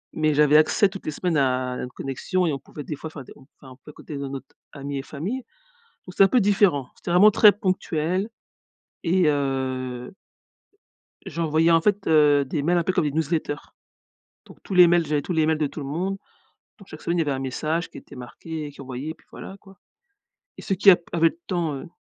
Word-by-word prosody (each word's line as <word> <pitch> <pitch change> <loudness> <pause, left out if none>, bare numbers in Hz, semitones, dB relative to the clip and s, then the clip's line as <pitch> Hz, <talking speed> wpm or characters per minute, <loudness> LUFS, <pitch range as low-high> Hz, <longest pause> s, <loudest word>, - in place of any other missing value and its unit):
Mais 155 -1 +1
j'avais 150 0 +5
accès 190 +5 +4
toutes 195 0 -10
les - - -2
semaines 170 +1 -1
à 130 -2 0
une 125 - -5
connexion 160 +9 -2
et 160 - 0
on 135 - -4
pouvait 145 +3 -10
des 150 - -5
fois 150 - -8
enfin, 155 -3 -9
des - - -14
enfin 130 -1 -17
on - - -12
pouvait 145 +3 -14
écouter 150 0 -9
no 140 -1 -5
notre 135 0 -7 0.3
ami 140 0 -5
et - - -2
famille. 165 - -4 0.7
Donc 180 - -10
c'est - - +7
un - - +6
peu 250 - +3
différent, 195 -10 +2
c'était - - -6
vraiment 200 +5 +7
très 210 0 +7
ponctuel 185 -2 -1 0.8
et 180 0 +2
heu 130 -3 -2 1.2
j'envoyais 165 0 +1
en 165 0 +5
fait, 205 +2 0
heu, 150 -3 +4
des 140 +2 -3
mails 175 +4 +2
un 170 - 0
peu 185 - 0
comme 170 - +1
des 150 - 0
newsletters. 155 -1 -1 0.9
Donc - - -16
tous - - -6
les 180 -1 +8
mails, 170 -1 +3
j'avais 150 -1 0
tous 180 - -4
les 160 -2 +2
mails 160 0 +1
de 150 -2 0
tout 155 - -9
le - - -5
monde, 180 +7 -3 0.6
donc 200 -4 -16
chaque 155 - -11
semaine 170 - -1
il - - +2
y - - +2
avait 145 - -2
un 135 - -2
message 155 +6 -2
qui - - -12
était - - -13
marqué 150 +5 -7
et 145 - -8
qui 140 - -13
envoyait 130 +3 -6
et - - -4
puis - - -28
voilà, 195 - -9
quoi. 195 -1 -18 0.8
Et - - -9
ceux 195 - -1
qui 195 +2 +7
ap 180 - +5
avaient 165 -1 +4
le 165 - -15
temps, 170 -5 -1
heu 135 - -9
155 Hz, 230 wpm, -24 LUFS, 140-180 Hz, 1.2 s, les